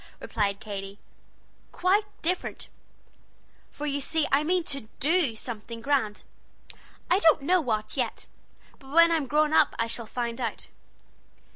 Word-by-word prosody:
replied 200 Hz, -3 st, -1 dB
Katy, 200 Hz, -2 st, -6 dB, 0.7 s
"quite 390 Hz, +4 st, +2 dB, 0.2 s
different; 360 Hz, +3 st, -2 dB, 1.0 s
for 295 Hz, -, -7 dB
you 285 Hz, -1 st, -1 dB
see 320 Hz, +3 st, 0 dB
I 280 Hz, +2 st, +4 dB
mean 355 Hz, +2 st, +1 dB
to 275 Hz, -7 st, -4 dB
do 305 Hz, -5 st, +2 dB
something 230 Hz, 0 st, -7 dB
grand. 230 Hz, -5 st, 0 dB, 0.9 s
I 365 Hz, -, +5 dB
don't 320 Hz, -6 st, +4 dB
know 360 Hz, +4 st, +3 dB
what, 215 Hz, -5 st, -2 dB
yet; 250 Hz, -4 st, -2 dB, 0.5 s
but 270 Hz, -, -15 dB
when 335 Hz, +2 st, +6 dB
I'm 315 Hz, -5 st, +1 dB
grown 300 Hz, +2 st, +2 dB
up 315 Hz, -2 st, +4 dB
I 230 Hz, -, +1 dB
shall 230 Hz, 0 st, -3 dB
find 235 Hz, +1 st, -3 dB
out." 230 Hz, -, -4 dB
275 Hz, 140 wpm, -27 LUFS, 230-320 Hz, 1.0 s, when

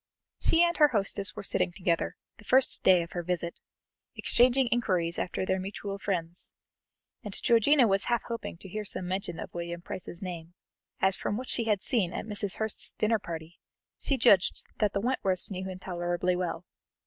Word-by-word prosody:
She 330 Hz, +1 st, +4 dB
and 345 Hz, 0 st, +2 dB
her 300 Hz, -, +7 dB
hostess 200 Hz, -5 st, 0 dB
were -, -, -6 dB
sitting 190 Hz, -, +3 dB
together, 175 Hz, -2 st, -1 dB, 0.2 s
the 210 Hz, -, -15 dB
first 255 Hz, +5 st, +3 dB
day 180 Hz, -2 st, +5 dB
of 170 Hz, -, -11 dB
her 175 Hz, -, -3 dB
visit, 170 Hz, -1 st, -3 dB, 0.6 s
exchanging 255 Hz, +2 st, +3 dB
inquiries 180 Hz, -8 st, 0 dB
after 185 Hz, -, -2 dB
their 190 Hz, 0 st, 0 dB
mutual 195 Hz, +1 st, -5 dB
friends, 175 Hz, -3 st, -4 dB, 0.7 s
and 205 Hz, -2 st, -1 dB
Georgiana 240 Hz, +3 st, +4 dB
was 195 Hz, -1 st, +2 dB
half 240 Hz, -1 st, 0 dB
hoping 230 Hz, -7 st, -6 dB
to -, -, -9 dB
hear 210 Hz, +3 st, -4 dB
some 190 Hz, -3 st, -3 dB
mention 185 Hz, -2 st, -3 dB
of -, -, -7 dB
William 170 Hz, 0 st, -5 dB
Price's 175 Hz, 0 st, -4 dB
name, 175 Hz, -2 st, -7 dB, 0.5 s
as 190 Hz, 0 st, +3 dB
from 205 Hz, -, -3 dB
what 255 Hz, +1 st, -6 dB
she 230 Hz, -, 0 dB
had 210 Hz, -3 st, +1 dB
seen 210 Hz, -9 st, +1 dB
at -, -, -4 dB
Mrs. 205 Hz, -2 st, 0 dB
Hurst's 220 Hz, -1 st, 0 dB
dinner 215 Hz, +1 st, +1 dB
party, 165 Hz, -2 st, -8 dB, 0.4 s
she 275 Hz, -, 0 dB
judged 205 Hz, -6 st, +4 dB, 0.2 s
that 210 Hz, -2 st, +1 dB
the 200 Hz, -, 0 dB
Wentworths 200 Hz, -6 st, 0 dB
knew 190 Hz, 0 st, -4 dB
him 185 Hz, -, -6 dB
tolerably 175 Hz, 0 st, -1 dB
well. 175 Hz, -1 st, -3 dB
190 Hz, 185 wpm, -29 LUFS, 175-220 Hz, 0.7 s, her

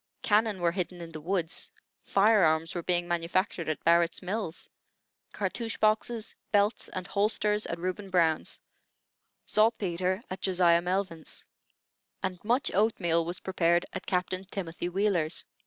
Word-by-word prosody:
Cannon 210 Hz, -2 st, +2 dB
were 170 Hz, -1 st, +3 dB
hidden 180 Hz, 0 st, -3 dB
in 170 Hz, -1 st, -8 dB
the 155 Hz, -1 st, -8 dB
woods; 175 Hz, 0 st, -2 dB, 0.3 s
fire 210 Hz, 0 st, +4 dB
arms 160 Hz, 0 st, +2 dB
were 175 Hz, -, -3 dB
being 175 Hz, 0 st, 0 dB
manufactured 175 Hz, 0 st, -1 dB
at 155 Hz, -, -3 dB
Barrett's 170 Hz, 0 st, +3 dB
Mills; 185 Hz, -2 st, -3 dB, 0.6 s
cartouch 230 Hz, -2 st, -3 dB
boxes, 215 Hz, +1 st, +1 dB, 0.2 s
belts, 205 Hz, +1 st, +2 dB
and 185 Hz, -1 st, -5 dB
holsters, 210 Hz, +1 st, +1 dB
at 170 Hz, -, -3 dB
Reuben 185 Hz, +3 st, -4 dB
Brown's; 165 Hz, -4 st, +1 dB, 0.9 s
saltpetre 190 Hz, -3 st, +1 dB
at 185 Hz, -, -6 dB
Josiah 175 Hz, -3 st, +4 dB
Melvin's; 180 Hz, -3 st, -3 dB, 0.8 s
and 185 Hz, -2 st, -3 dB
much 240 Hz, +5 st, +1 dB
oatmeal 180 Hz, -5 st, +2 dB
was 175 Hz, +2 st, -3 dB
prepared 175 Hz, -2 st, +2 dB
at -, -, -6 dB
Captain 185 Hz, 0 st, 0 dB
Timothy 175 Hz, -3 st, -4 dB
Wheeler's. 180 Hz, -4 st, 0 dB
185 Hz, 135 wpm, -29 LUFS, 170-205 Hz, 0.9 s, fire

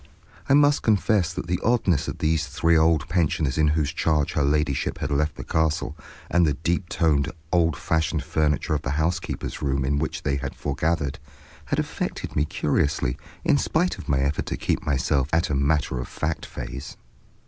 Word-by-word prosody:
I 135 Hz, -, +6 dB
must 145 Hz, 0 st, +4 dB
confess 105 Hz, -4 st, +2 dB
that 85 Hz, -, -5 dB
the 90 Hz, +1 st, -1 dB
oddness 105 Hz, -, +2 dB
of -, -, -4 dB
these 80 Hz, 0 st, +1 dB
three 80 Hz, +3 st, +2 dB
old 80 Hz, -2 st, +3 dB
pensioners 80 Hz, -5 st, +1 dB
in 75 Hz, -, +4 dB
whose 75 Hz, 0 st, +1 dB
charge 75 Hz, -3 st, +1 dB
her -, -, +1 dB
ladyship 70 Hz, -1 st, 0 dB
had -, -, -3 dB
left 75 Hz, +2 st, +1 dB
the -, -, -7 dB
castle, 80 Hz, -2 st, 0 dB, 0.3 s
and 85 Hz, -, +3 dB
the 75 Hz, -4 st, +2 dB
deep 85 Hz, +4 st, -1 dB
toned, 75 Hz, -3 st, +1 dB, 0.2 s
old 85 Hz, -3 st, +2 dB
fashioned 80 Hz, -2 st, 0 dB
furniture 75 Hz, -1 st, 0 dB
of 75 Hz, -, 0 dB
the 70 Hz, -1 st, -2 dB
housekeeper's 85 Hz, +2 st, -2 dB
room, 70 Hz, -2 st, 0 dB
in 70 Hz, +2 st, +1 dB
which 80 Hz, -, -3 dB
they 70 Hz, -, 0 dB
foregathered, 70 Hz, +1 st, -2 dB, 0.5 s
had -, -, -1 dB
affected -, -, -3 dB
me 75 Hz, -, +2 dB
curiously 70 Hz, -4 st, 0 dB, 0.3 s
in 145 Hz, -, +4 dB
spite 175 Hz, +6 st, 0 dB
of -, -, -9 dB
my 65 Hz, -1 st, +2 dB
effort 70 Hz, +2 st, -1 dB
to -, -, -2 dB
keep -, -, -1 dB
myself 70 Hz, -1 st, +1 dB
at 80 Hz, -1 st, +1 dB
a -, -, +1 dB
matter 70 Hz, -2 st, +1 dB
of 60 Hz, -, -4 dB
fact 80 Hz, 0 st, -3 dB
phase. 70 Hz, +1 st, -7 dB
75 Hz, 180 wpm, -24 LUFS, 70-85 Hz, 0.5 s, I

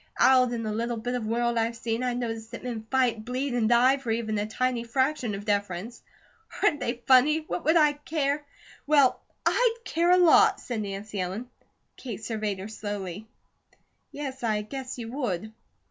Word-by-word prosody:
Out 255 Hz, -2 st, +5 dB
in 235 Hz, -1 st, -3 dB
the 215 Hz, -, -2 dB
little 235 Hz, +2 st, -2 dB
bit 245 Hz, +3 st, -3 dB
of 240 Hz, -3 st, -2 dB
world 235 Hz, +1 st, +1 dB
I've 230 Hz, +1 st, 0 dB
seen, 230 Hz, 0 st, -2 dB
I 250 Hz, -1 st, -1 dB
notice 225 Hz, -2 st, -4 dB
that -, -, -9 dB
men 230 Hz, -3 st, -5 dB
fight, 250 Hz, -4 st, +1 dB
bleed, 255 Hz, +3 st, -2 dB
and 230 Hz, -3 st, +1 dB
die 250 Hz, +3 st, +5 dB
for 270 Hz, -4 st, -7 dB
even 220 Hz, -1 st, -1 dB
a 205 Hz, -, -2 dB
tiny 245 Hz, +1 st, -1 dB
fraction 255 Hz, -2 st, 0 dB
of 200 Hz, +1 st, -7 dB
deference. 205 Hz, +2 st, -2 dB, 0.6 s
Aren't 295 Hz, -, +3 dB
they 240 Hz, -1 st, -3 dB
funny? 280 Hz, +5 st, +5 dB
What 315 Hz, +2 st, -5 dB
would 320 Hz, +3 st, +5 dB
I 300 Hz, -2 st, +5 dB
care 295 Hz, -1 st, -2 dB, 0.2 s
?" -, -, -23 dB
"Well, 285 Hz, -4 st, +4 dB, 0.2 s
I'D 470 Hz, -1 st, +2 dB
care 340 Hz, +1 st, +1 dB
a 360 Hz, -, +6 dB
lot!" 350 Hz, -3 st, +6 dB
said 235 Hz, -3 st, -4 dB
Nancy 200 Hz, 0 st, -5 dB
Ellen. 205 Hz, +8 st, -5 dB, 0.5 s
Kate 225 Hz, -4 st, -7 dB
surveyed 215 Hz, -3 st, -2 dB
her 190 Hz, +2 st, -6 dB
slowly. 205 Hz, -2 st, -6 dB, 0.8 s
"Yes, 270 Hz, -2 st, -6 dB
I 215 Hz, -3 st, 0 dB
guess 260 Hz, +4 st, -6 dB
you 230 Hz, -1 st, -6 dB
would." 220 Hz, -6 st, -3 dB
235 Hz, 185 wpm, -27 LUFS, 220-265 Hz, 0.8 s, a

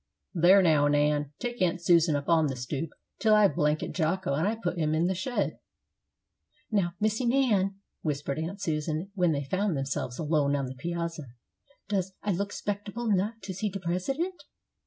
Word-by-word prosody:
"There, 185 Hz, +2 st, +6 dB
now, 150 Hz, -4 st, +4 dB
Nan, 145 Hz, 0 st, +2 dB
take 245 Hz, -2 st, -4 dB
Aunt 180 Hz, 0 st, +2 dB
Susan 170 Hz, -2 st, +4 dB
up 145 Hz, 0 st, -3 dB
on 160 Hz, -2 st, +4 dB
the 135 Hz, -, -3 dB
stoop, 135 Hz, +5 st, -4 dB, 0.3 s
till 215 Hz, -1 st, +5 dB
I 210 Hz, -1 st, +6 dB
blanket 150 Hz, -1 st, 0 dB
Jocko 175 Hz, -1 st, 0 dB
and 200 Hz, +10 st, 0 dB
put 175 Hz, -6 st, -2 dB
him 155 Hz, -1 st, +1 dB
in 165 Hz, +2 st, +2 dB
the 185 Hz, -, +1 dB
shed." 190 Hz, +8 st, -2 dB, 1.1 s
"Now, 185 Hz, -5 st, +1 dB
Missy 215 Hz, +3 st, +1 dB
Nan," 235 Hz, -7 st, +2 dB, 0.3 s
whispered 145 Hz, -1 st, -2 dB
Aunt 170 Hz, +6 st, -4 dB
Susan, 160 Hz, +2 st, -2 dB
when 180 Hz, -4 st, +2 dB
they 145 Hz, -2 st, -1 dB
found 185 Hz, +3 st, 0 dB
themselves 135 Hz, -2 st, -3 dB
alone 150 Hz, -3 st, +1 dB
on 140 Hz, -1 st, -1 dB
the 130 Hz, -, -6 dB
piazza, 170 Hz, +1 st, -4 dB, 0.6 s
"does 190 Hz, -2 st, -1 dB
I 205 Hz, -, 0 dB
look 200 Hz, +3 st, -1 dB
'spectable 205 Hz, +2 st, -2 dB
nuff 205 Hz, +5 st, 0 dB
to 195 Hz, -1 st, -5 dB
see 205 Hz, +4 st, -2 dB
de 195 Hz, 0 st, -5 dB
President?" 190 Hz, -, -1 dB
175 Hz, 175 wpm, -28 LUFS, 150-200 Hz, 1.1 s, There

